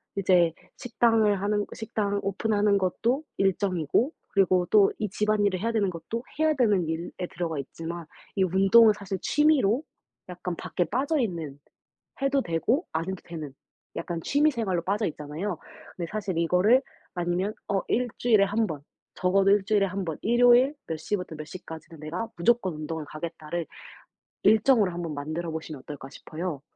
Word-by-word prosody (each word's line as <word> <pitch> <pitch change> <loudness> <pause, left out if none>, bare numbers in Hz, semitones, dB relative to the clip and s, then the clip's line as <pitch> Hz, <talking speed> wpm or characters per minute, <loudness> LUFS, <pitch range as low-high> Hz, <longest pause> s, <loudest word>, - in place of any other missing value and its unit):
이제 180 -4 +3 0.2
식당을 225 -4 +2
하는 205 0 0
식당을 205 -2 -2
오픈하는 205 +1 +1
것도 230 - 0
일정이고 195 - +1 0.2
그리고 185 -2 +3
또 205 -2 +5
이 210 - -1
집안일을 205 -2 +1
해야 230 +4 -1
되는 210 -4 +1
것도 200 +7 -5 0.2
해야 315 0 +4
되는 210 - +2
일에 160 +2 -3 0.2
들어가 165 -3 -3
있지만 165 +5 -6 0.3
이 195 - +3
운동은 195 +5 +6
사실 200 -1 -5
취미로 295 -6 +3 0.5
약간 180 0 -5
밖에 180 - -1
빠져있는, 205 - -1 0.6
해도 275 0 +2
되고 225 - 0
안 160 +1 -1
해도 190 - -2
되는 155 -5 -7 0.4
약간 170 -2 -4
취미 295 +2 +3
생활로 205 -9 -1
빠져 205 +4 0
있잖아요. 155 +5 -4 0.4
근데 170 -2 -3
사실 200 -5 -3
이거를 180 +9 +4 0.3
아니면 175 +4 -1 0.2
어 195 -1 +1
'1 250 +2 +1
주일에 220 -5 +4
1 215 +3 0
번, 145 - -14 0.3
적어도 195 +1 +3
1 205 -1 +4
주일에 205 -1 +3
1 190 0 -4
번 160 -3 -4
일요일 245 +4 +5
몇 160 - -3
시부터 180 0 -3
몇 155 0 -7
시까지는 165 -1 -10
내가 165 +9 -4
무조건 205 0 +2
운동을 155 +1 -5
가겠다.'를 160 +2 -5 0.8
일정으로 220 -3 +4
1 175 0 -5
번 165 -3 -4
만들어 155 +4 -4
보시면 160 -2 -6
어떨까 135 -1 -9
싶어요. 155 +1 -6
195 Hz, 335 characters per minute, -27 LUFS, 170-220 Hz, 0.8 s, 운동은